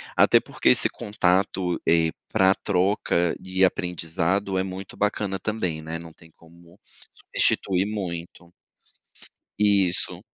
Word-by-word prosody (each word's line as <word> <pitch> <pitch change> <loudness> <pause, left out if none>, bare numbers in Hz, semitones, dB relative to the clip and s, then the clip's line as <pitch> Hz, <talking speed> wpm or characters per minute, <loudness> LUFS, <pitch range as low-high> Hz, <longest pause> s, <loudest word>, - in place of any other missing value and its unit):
Até - - +5
porque - - 0
esse - - +4
contato, 95 -2 0
eh, 80 -1 +3 0.2
pra 95 0 +4
troca 90 -3 0
e 95 0 0
aprendizado 90 +2 -1
é 95 - +1
muito 95 0 -8
bacana 105 -2 -1
também, 90 -8 -3
né, 80 +1 -5
não 85 0 -11
tem 80 - -19
como 85 +2 -20 0.4
substituir 95 0 +1
muito. 90 -4 -6 1.1
Isso. 95 -3 +2
90 Hz, 115 wpm, -24 LUFS, 85-95 Hz, 1.1 s, Até